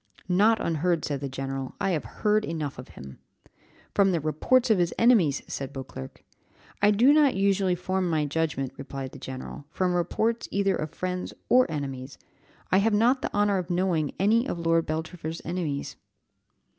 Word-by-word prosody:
"Not 205 +5 +4
unheard," 170 0 0
said 145 -2 -2
the 140 - -3
general, 135 0 -5
"I 195 - 0
have 160 -4 -1 0.2
heard 215 0 +3
enough 155 -7 -4
of - - -9
him." 70 0 -10 0.7
"From 200 -1 +4
the 170 - +1
reports 225 - +2
of 210 - +4
his 175 -1 0
enemies," 205 - +4
said 135 0 -5
Beauclerc. 130 - -9 0.6
"I 205 - +5
do 235 +7 +5
not 295 -3 +4
usually 195 -1 +2
form 185 +1 -1
my 155 -2 +1
judgment," 145 -3 -2
replied 135 -1 -6
the - - -11
general, 130 +2 -7
"from 180 +3 0
reports 220 +7 0
either 195 -1 +1
of 155 -1 -3
friends 180 +3 -4
or 255 -3 +5
enemies; 135 -4 -5 0.5
I 190 - +5
have 210 +1 +2
not 245 +5 +3
the - - -3
honour 205 -1 +2
of 180 -1 -5
knowing 175 -4 0
any 225 +6 +3
of 175 - -3
Lord 165 -1 +1
Beltravers' 160 +1 -4
enemies." 160 -5 -3
175 Hz, 170 wpm, -26 LUFS, 150-200 Hz, 0.7 s, I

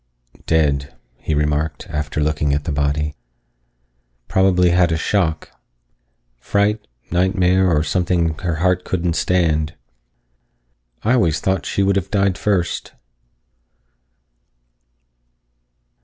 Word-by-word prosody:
"Dead," 70 -4 +1 0.2
he 80 - -2
remarked, 75 +1 -1
after 75 0 -2
looking 75 -1 0
at 75 - -2
the 80 - -3
body. 75 +1 -1 1.1
"Probably 90 -2 +3
had 90 -1 +3
a 80 - +1
shock. 80 -3 -1 0.9
Fright, 105 - 0 0.2
nightmare, 95 +1 +2
or 75 -3 +2
something 85 0 0
her 85 -2 -2
heart 90 +2 +1
couldn't 90 -2 -1
stand. 80 -5 +1 1.3
I 115 - +2
always 85 -11 +2
thought 95 +1 -1
she 100 - 0
would 100 0 +2
have 95 0 -2
died 100 -3 +1
first." 95 -4 -1
85 Hz, 105 wpm, -20 LUFS, 75-95 Hz, 1.3 s, Probably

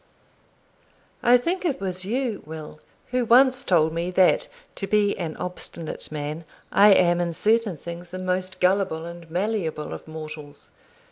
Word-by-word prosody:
I 245 0 +6
think 345 +10 -2
it 320 -7 -1
was 185 -1 0
you, 240 0 -2
Will, 155 0 -9 0.3
who 250 0 +1
once 255 +2 +5
told 160 -3 +3
me, 170 +2 -2
that, 185 0 +3 0.3
to 195 - -2
be 205 0 +2
an 165 -4 -5
obstinate 170 -3 -5
man, 150 +2 -4 0.3
I 205 +1 +7
am 175 -2 +4
in 170 -1 -1
certain 215 -1 +1
things 170 +3 -8
the 185 - -6
most 185 0 -2
gullable 180 -3 +1
and 170 -1 -10
malleable 175 -4 -2
of - - -9
mortals. 155 -2 -6
180 Hz, 150 wpm, -24 LUFS, 165-210 Hz, 0.3 s, I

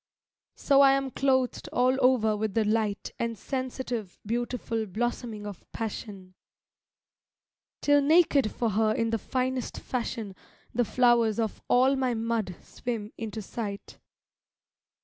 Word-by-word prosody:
So 280 -1 +4
I 275 -1 +7
am 270 -1 0
clothed 260 -2 +1
all 255 +2 +3
over 230 -4 +4
with 210 -1 -2
the 225 -1 +3
light 215 -1 0
And 230 -1 -2
sensitive 250 -4 -4
beautiful 230 -1 -2
blossoming 225 +1 -3
of 205 -3 -8
passion; 200 -4 -6 1.5
Till 290 0 +5
naked 290 -5 +4
for 230 -2 -1
her 215 +1 +2
in 230 0 0
the 225 - 0
finest 255 +2 -2
fashion 230 -5 -4 0.4
The 245 0 +2
flowers 235 -2 +3
of 220 -2 -2
all 260 +2 +4
my 260 -3 0
mud 225 -5 -1
swim 225 -3 -5
into 220 -1 -5
sight. 200 -1 -6
230 Hz, 130 wpm, -28 LUFS, 215-255 Hz, 1.5 s, I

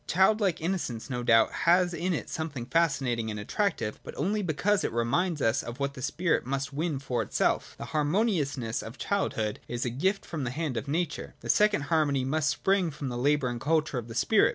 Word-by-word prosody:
Child 190 +5 +4
like 185 -5 +1
innocence 160 -9 -3
no 125 -1 -2
doubt 115 -2 +4
has 175 +1 +3
in 180 +2 -1
it 165 - -2
something 150 -6 -4
fascinating 130 -6 +1
and 105 -1 -4
attractive: 110 - -1
but - - -9
only 205 +8 0
because 195 +4 +1
it - - -1
reminds 145 +8 0
us 115 +5 +2
of 120 +3 -7
what 140 0 -1
the 135 - -9
spirit 170 +6 0
must 135 +2 -3
win 155 0 -1
for 125 -3 -2
itself. 105 - 0
The - - -6
harmoniousness 150 - 0
of 115 +4 -9
childhood 110 - -1
is 120 +1 -3
a 120 - -1
gift 190 - 0
from 155 -5 -4
the 125 - -1
hand 150 0 -3
of 115 +5 -3
nature: 165 +3 -2
the - - -8
second 210 -6 +3
harmony 140 -5 +2
must 155 +3 +1
spring 190 +4 +1
from 145 -3 -5
the 120 - -4
labour 140 0 +2
and 120 -1 -5
culture 155 -3 +1
of 115 - -8
the 115 - -8
spirit. 205 - +4
145 Hz, 210 wpm, -28 LUFS, 125-175 Hz, -, Child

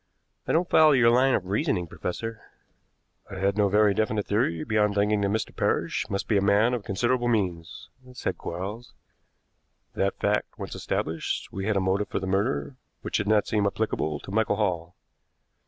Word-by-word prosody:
"I - - +1
don't 175 +2 +2
follow 155 -3 +6
your 115 -3 +5
line 130 +2 +4
of 95 - -2
reasoning, 95 -2 0
professor." 110 +7 -5 0.9
"I - - -7
had 95 +1 +1
no 105 -1 +2
very 105 0 +4
definite 110 0 0
theory 100 -7 0
beyond 105 -2 +1
thinking 105 +1 +2
that 100 - +2
Mr. 110 +2 -2
Parrish - - -1
must 100 0 -3
be 105 - +2
a - - +2
man 100 +5 +3
of 120 -4 -2
considerable 120 +6 0
means," 90 -8 -2 0.3
said 125 - -4
Quarles. 105 +7 -6 1.0
"That 100 0 -1
fact 105 +1 -1
once - - -6
established, 80 0 -3
we 95 +1 -3
had 105 -2 +1
a - - +3
motive 95 +2 0
for - - -2
the 95 - -5
murder, 100 +7 -1 0.3
which - - -1
did 105 - -2
not 105 -1 +3
seem 105 -2 +1
applicable 95 -8 -2
to - - -9
Michael 110 0 +1
Hall. 90 -5 -2
105 Hz, 180 wpm, -26 LUFS, 95-110 Hz, 1.0 s, follow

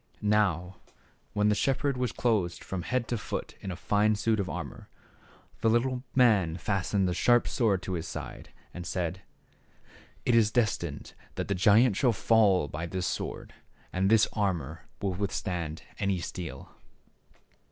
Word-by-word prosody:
Now, 95 -3 +1 0.6
when 105 0 +2
the - - +4
shepherd 135 +4 +1
was 125 -2 -1
clothed 100 -10 0
from 95 -2 -4
head 125 +5 -1
to 120 - -1
foot - - -5
in 95 - -5
a 90 - -3
fine 105 +4 +2
suit 110 +1 +1
of 95 -2 -1
armor, 80 -4 -7 0.7
the 115 - +2
little 125 +2 +1
man 105 -10 +4
fastened 95 +1 0
a 90 - 0
sharp 120 +6 +3
sword 105 -7 +1
at 95 - -2
his 85 -2 -3
side - - -7 0.2
and 90 -1 -6
said, 90 +1 -2 0.5
" - - -26
It 120 - +3
is 115 -3 +5
destined 105 - -1 0.2
that - - -4
the - - +2
giant 105 +3 +4
shall 125 -4 +3
fall 100 -6 +3
by 80 +4 -5
this 90 +1 -3
sword, - - -4 0.4
and 95 +1 +2
this 110 -1 +5
armor 85 - -2 0.2
will 95 -2 0
withstand 90 -4 -3 0.2
any 100 -2 +1
steel." 85 -5 -6
100 Hz, 160 wpm, -29 LUFS, 90-110 Hz, 0.7 s, is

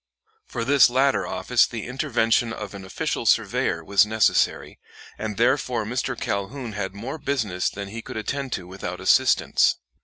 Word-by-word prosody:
For 115 -2 -4
this 140 -1 +6
latter 135 +2 +2
office - - +2
the - - -6
intervention 120 -3 +1
of 105 -3 -7
an 100 -1 -8
official 95 - -3
surveyor 85 - +1
was 100 +4 +4
necessary, 110 0 +1 0.4
and 105 -2 -5
therefore 120 -2 +1
Mr. 125 +2 -3
Calhoun 115 +5 -3
had 100 -2 -4
more 130 +9 -6
business 120 -11 -1
than 100 -1 -7
he 115 +3 -6
could - - -8
attend 135 +5 -3
to 90 - -4
without 95 +2 -6
assistance. - - +3
115 Hz, 155 wpm, -24 LUFS, 100-130 Hz, 0.4 s, this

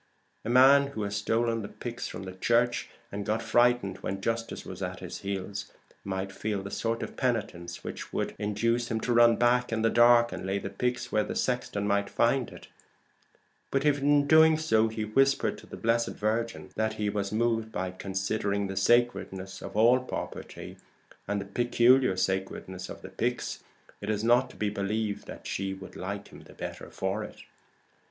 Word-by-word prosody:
A 110 - -4
man 135 +3 +7
who 125 -6 -4
had 100 0 -3
stolen 115 +2 0
the 105 - -5
pyx, 120 +2 -6
and 100 +2 -1
got 110 +2 -1
frightened 120 -2 +3
when 95 +1 -4
justice 115 +3 -3
was - - -8
at - - -4
his - - -7
heels, 100 +1 -4 0.3
might 95 0 -3
feel 105 -1 -3
the 100 - -7
sort 115 0 -1
of - - -7
penitence 100 -9 -2
which - - -6
would - - -2
induce 115 +3 0
him 110 - -1
to 120 - 0
run 120 0 +6
back 125 +1 +2
in 110 0 0
the 115 - +3
dark 120 0 +6
and - - -6
lay 95 +1 -1
the 100 0 -5
pyx 125 0 -2
where 105 - +2
the - - -5
sexton 125 -5 -1
might 100 0 +1
find 120 +1 +2
it; - - -12 1.0
but 135 +1 0
if 145 -1 +3
in 145 +1 +4
doing 160 +1 +6
so 115 -9 +3
he 110 -1 -3
whispered 135 +6 +2
to - - -15
the - - -9
Blessed 115 +1 +1
Virgin 115 +2 -2
that 110 0 0
he 105 -1 -2
was 100 -1 -2
moved 115 0 0
by 95 -3 -3
considering 100 +2 -2
the 95 0 -4
sacredness 95 -3 +1
of - - -7
all 120 +4 +6
property, 125 - -7 0.5
and 105 0 0
the 100 - -5
peculiar 120 +1 +3
sacredness 95 0 -2
of - - -9
the - - -8
pyx, 120 +6 -2 0.4
it 100 - -4
is 105 0 0
not 120 +3 +4
to - - -15
be 105 -1 -1
believed 105 +1 -2
that - - -9
she 95 0 -2
would 95 -1 -11
like 100 +2 -5
him - - -13
the - - -15
better - - -7
for 95 +3 -2
it. - - -10
110 Hz, 185 wpm, -28 LUFS, 100-120 Hz, 1.0 s, man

